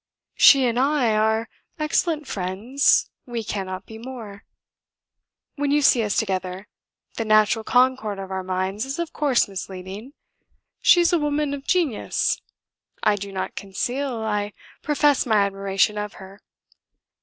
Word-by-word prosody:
She 275 Hz, -2 st, +7 dB
and 240 Hz, 0 st, +1 dB
I 265 Hz, -5 st, +2 dB
are 220 Hz, +1 st, +1 dB, 0.3 s
excellent 310 Hz, 0 st, 0 dB
friends; 210 Hz, +5 st, +1 dB, 0.2 s
we 235 Hz, -2 st, -4 dB
cannot 190 Hz, -3 st, -5 dB
be 220 Hz, 0 st, -11 dB
more. 225 Hz, -5 st, -9 dB, 1.1 s
When 290 Hz, 0 st, 0 dB
you 295 Hz, +1 st, +2 dB
see 245 Hz, -, +5 dB
us 210 Hz, -2 st, -1 dB
together, 185 Hz, -1 st, -2 dB, 0.5 s
the 225 Hz, -, 0 dB
natural 215 Hz, +1 st, +3 dB
concord 250 Hz, -4 st, +2 dB
of 195 Hz, -1 st, -7 dB
our 190 Hz, 0 st, -2 dB
minds 185 Hz, +3 st, -2 dB
is 270 Hz, +1 st, -4 dB
of 340 Hz, -1 st, -4 dB
course 280 Hz, -5 st, +2 dB
misleading. 195 Hz, +5 st, -8 dB, 0.7 s
She 350 Hz, 0 st, +6 dB
is 345 Hz, -, +2 dB
a 345 Hz, -, +4 dB
woman 295 Hz, -1 st, -1 dB
of 280 Hz, -1 st, -7 dB
genius. 335 Hz, -, 0 dB, 0.6 s
I 210 Hz, -, +4 dB
do 200 Hz, 0 st, -7 dB
not 190 Hz, -1 st, -4 dB
conceal, 245 Hz, +7 st, -3 dB
I 210 Hz, -1 st, -2 dB, 0.3 s
profess 295 Hz, -3 st, +2 dB
my 220 Hz, -, +2 dB
admiration 195 Hz, +1 st, 0 dB
of 210 Hz, 0 st, -5 dB
her. 190 Hz, +2 st, -13 dB
220 Hz, 145 wpm, -23 LUFS, 195-275 Hz, 1.1 s, She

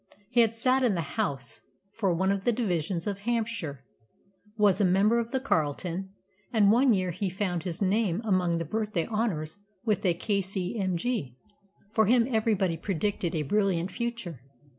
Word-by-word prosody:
He 240 Hz, -1 st, +5 dB
had 230 Hz, -1 st, +2 dB
sat 255 Hz, +3 st, +2 dB
in 240 Hz, -6 st, +2 dB
the 165 Hz, -4 st, -4 dB
House 135 Hz, -, -2 dB, 0.3 s
for 200 Hz, -5 st, 0 dB
one 190 Hz, +3 st, +1 dB
of 200 Hz, -1 st, -1 dB
the 240 Hz, -, +3 dB
divisions 180 Hz, -7 st, -1 dB
of 200 Hz, -1 st, -3 dB
Hampshire, 215 Hz, -, -2 dB, 0.7 s
was 205 Hz, -2 st, +4 dB
a -, -, +4 dB
member 200 Hz, +5 st, +4 dB
of 230 Hz, -1 st, -3 dB
the 265 Hz, -, 0 dB
Carlton, 175 Hz, -, -1 dB, 0.4 s
and 210 Hz, -4 st, +5 dB
one 250 Hz, +3 st, +5 dB
year 185 Hz, -4 st, +1 dB
he 185 Hz, +3 st, -2 dB
found 180 Hz, -2 st, -2 dB
his 180 Hz, +2 st, -3 dB
name 195 Hz, -2 st, +1 dB
among 180 Hz, -4 st, +2 dB
the 165 Hz, -, -2 dB
Birthday 210 Hz, -1 st, -1 dB
Honours 205 Hz, -7 st, -2 dB, 0.3 s
with 215 Hz, -3 st, +1 dB
a 180 Hz, -3 st, +2 dB
K.C.M.G. 190 Hz, -, -2 dB, 0.6 s
For 220 Hz, -2 st, +3 dB
him 235 Hz, +1 st, +5 dB
everybody 215 Hz, -8 st, +1 dB
predicted 180 Hz, 0 st, -2 dB
a 155 Hz, -, 0 dB
brilliant 190 Hz, +1 st, +1 dB
future. 230 Hz, -, -4 dB
195 Hz, 160 wpm, -28 LUFS, 175-225 Hz, 0.7 s, He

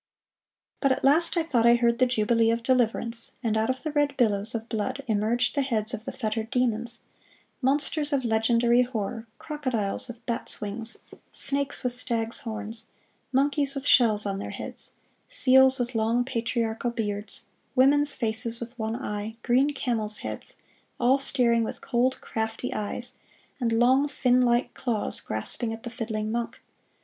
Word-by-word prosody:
But 275 Hz, -, +2 dB
at 260 Hz, -, 0 dB
last 325 Hz, +6 st, +3 dB
I 335 Hz, -, +3 dB
thought 240 Hz, -7 st, +2 dB
I 235 Hz, -, +7 dB
heard 235 Hz, 0 st, +2 dB
the 255 Hz, -, +5 dB
jubilee 230 Hz, -1 st, +2 dB
of 230 Hz, 0 st, 0 dB
deliverance, 230 Hz, -2 st, 0 dB
and 220 Hz, -2 st, 0 dB
out 220 Hz, +2 st, +1 dB
of 260 Hz, 0 st, -2 dB
the 310 Hz, -, -2 dB
red 290 Hz, -1 st, +1 dB
billows 215 Hz, -2 st, +1 dB
of 225 Hz, 0 st, -4 dB
blood 250 Hz, +5 st, -3 dB
emerged 225 Hz, +2 st, +1 dB
the 280 Hz, -, +1 dB
heads 230 Hz, -4 st, -1 dB
of 225 Hz, 0 st, -5 dB
the -, -, -4 dB
fettered 220 Hz, -2 st, -3 dB
demons: 235 Hz, -2 st, 0 dB, 0.6 s
monsters 290 Hz, +3 st, 0 dB
of 270 Hz, -3 st, 0 dB
legendary 235 Hz, +2 st, +3 dB
horror, 225 Hz, -2 st, -3 dB
crocodiles 255 Hz, -11 st, -3 dB
with 235 Hz, -1 st, -11 dB
bats' 235 Hz, -2 st, -2 dB
wings, 220 Hz, +2 st, -3 dB, 0.3 s
snakes 280 Hz, 0 st, +1 dB
with 250 Hz, -1 st, +1 dB
stags' 235 Hz, -2 st, +2 dB
horns, 225 Hz, 0 st, -6 dB, 0.5 s
monkeys 280 Hz, +1 st, +1 dB
with 275 Hz, 0 st, -4 dB
shells 215 Hz, -6 st, +5 dB
on 195 Hz, -1 st, -2 dB
their -, -, -5 dB
heads, -, -, -8 dB, 0.4 s
seals 265 Hz, -, +5 dB
with 245 Hz, -1 st, -2 dB
long 230 Hz, +2 st, +1 dB
patriarchal 230 Hz, -1 st, -1 dB
beards, 210 Hz, -3 st, -4 dB, 0.3 s
women's 285 Hz, +3 st, +4 dB
faces 230 Hz, 0 st, 0 dB
with 235 Hz, +1 st, -8 dB
one 220 Hz, +1 st, -2 dB
eye, 215 Hz, -3 st, -4 dB
green 260 Hz, +4 st, +3 dB
camels' 225 Hz, -6 st, -2 dB
heads, -, -, -5 dB, 0.4 s
all 255 Hz, +3 st, +4 dB
staring 240 Hz, -4 st, +2 dB
with -, -, -5 dB
cold, 255 Hz, +1 st, 0 dB
crafty 225 Hz, +2 st, -3 dB
eyes, 245 Hz, +4 st, -5 dB, 0.4 s
and 235 Hz, -3 st, 0 dB
long, 255 Hz, +5 st, +4 dB
fin 255 Hz, -3 st, +2 dB
like 240 Hz, 0 st, +2 dB
claws 235 Hz, -5 st, -2 dB
grasping 110 Hz, -, -3 dB
at 225 Hz, 0 st, -7 dB
the 235 Hz, -, -6 dB
fiddling 220 Hz, -2 st, -3 dB
monk. 235 Hz, 0 st, -3 dB
235 Hz, 160 wpm, -26 LUFS, 225-260 Hz, 0.6 s, I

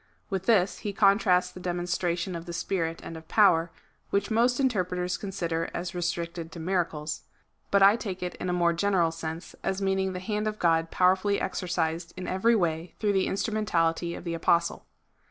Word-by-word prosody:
With 190 Hz, -1 st, -2 dB
this 195 Hz, -5 st, +3 dB
he 205 Hz, -2 st, -4 dB
contrasts 195 Hz, -3 st, +3 dB
the 185 Hz, -, -10 dB
demonstration 175 Hz, 0 st, -2 dB
of 170 Hz, +1 st, -7 dB
the 170 Hz, -, -5 dB
Spirit 165 Hz, -2 st, -2 dB
and 165 Hz, -, -7 dB
of 160 Hz, 0 st, -10 dB
power, 180 Hz, -5 st, +4 dB, 0.4 s
which 200 Hz, +3 st, 0 dB
most 240 Hz, +3 st, +3 dB
interpreters 180 Hz, -8 st, 0 dB
consider 170 Hz, -5 st, -3 dB
as 175 Hz, +1 st, -4 dB
restricted 170 Hz, -1 st, -3 dB
to 170 Hz, -, -8 dB
miracles; 165 Hz, -3 st, -2 dB, 0.5 s
but 200 Hz, -1 st, +4 dB
I 200 Hz, +3 st, +7 dB
take 190 Hz, -5 st, -5 dB
it 180 Hz, -, -3 dB
in 185 Hz, -, -3 dB
a -, -, +1 dB
more 175 Hz, -1 st, +2 dB
general 175 Hz, -2 st, +2 dB
sense, 165 Hz, +1 st, -6 dB
as 195 Hz, -, -1 dB
meaning 190 Hz, -1 st, 0 dB
the 180 Hz, -, -4 dB
hand 210 Hz, +3 st, -2 dB
of 215 Hz, 0 st, -2 dB
God 165 Hz, -2 st, +2 dB
powerfully 190 Hz, +3 st, +2 dB
exercised 170 Hz, -2 st, -2 dB
in 185 Hz, -, -5 dB
every 225 Hz, +6 st, +3 dB
way 170 Hz, -3 st, -1 dB
through 210 Hz, -2 st, +1 dB
the 190 Hz, -1 st, +2 dB
instrumentality 175 Hz, -6 st, 0 dB
of -, -, -8 dB
the 170 Hz, -1 st, -3 dB
Apostle. 170 Hz, +1 st, +1 dB
180 Hz, 180 wpm, -27 LUFS, 170-195 Hz, 0.5 s, I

